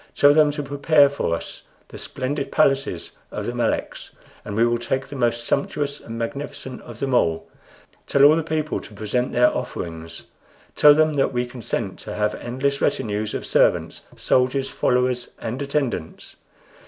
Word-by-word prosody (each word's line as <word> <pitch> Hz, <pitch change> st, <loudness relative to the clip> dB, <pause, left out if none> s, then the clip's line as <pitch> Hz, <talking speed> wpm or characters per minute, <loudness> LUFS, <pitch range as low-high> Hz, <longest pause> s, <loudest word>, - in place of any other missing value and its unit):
Tell 145 Hz, 0 st, +6 dB
them 155 Hz, -1 st, +5 dB
to 145 Hz, -, -4 dB
prepare 145 Hz, +1 st, +4 dB
for 140 Hz, -12 st, -1 dB
us -, -, -7 dB, 0.3 s
the -, -, -10 dB
splendid 140 Hz, +2 st, -4 dB
palaces 135 Hz, -, +1 dB, 0.2 s
of -, -, -5 dB
the -, -, -3 dB
Meleks, -, -, -2 dB, 0.3 s
for 105 Hz, -, -7 dB
we 110 Hz, +3 st, +3 dB
will 120 Hz, 0 st, +1 dB
take 130 Hz, +3 st, -2 dB
the 145 Hz, -, -9 dB
most 120 Hz, -2 st, 0 dB
sumptuous 140 Hz, +3 st, -1 dB
and 115 Hz, 0 st, -8 dB
magnificent 130 Hz, +1 st, -5 dB
of 120 Hz, -2 st, -11 dB
them 135 Hz, -1 st, -1 dB
all. 80 Hz, -8 st, +1 dB, 0.6 s
Tell 140 Hz, -, +3 dB
all 150 Hz, +2 st, +8 dB
the 165 Hz, -, +1 dB
people 155 Hz, -1 st, -2 dB
to 105 Hz, -, -13 dB
present 110 Hz, +4 st, -1 dB
their 125 Hz, 0 st, +3 dB
offerings. 85 Hz, -9 st, -6 dB, 0.5 s
Tell 150 Hz, 0 st, +7 dB
them 155 Hz, -1 st, +2 dB
that 135 Hz, -, +1 dB
we 125 Hz, 0 st, 0 dB
consent 120 Hz, -2 st, -4 dB
to -, -, -7 dB
have 105 Hz, 0 st, 0 dB
endless 135 Hz, +3 st, -2 dB
retinues 105 Hz, 0 st, -1 dB
of -, -, -4 dB
servants, -, -, +2 dB, 0.2 s
soldiers, 130 Hz, +1 st, +1 dB
followers, 125 Hz, 0 st, 0 dB
and 120 Hz, +5 st, -5 dB
attendants. 140 Hz, -, -3 dB
130 Hz, 165 wpm, -22 LUFS, 115-140 Hz, 0.6 s, all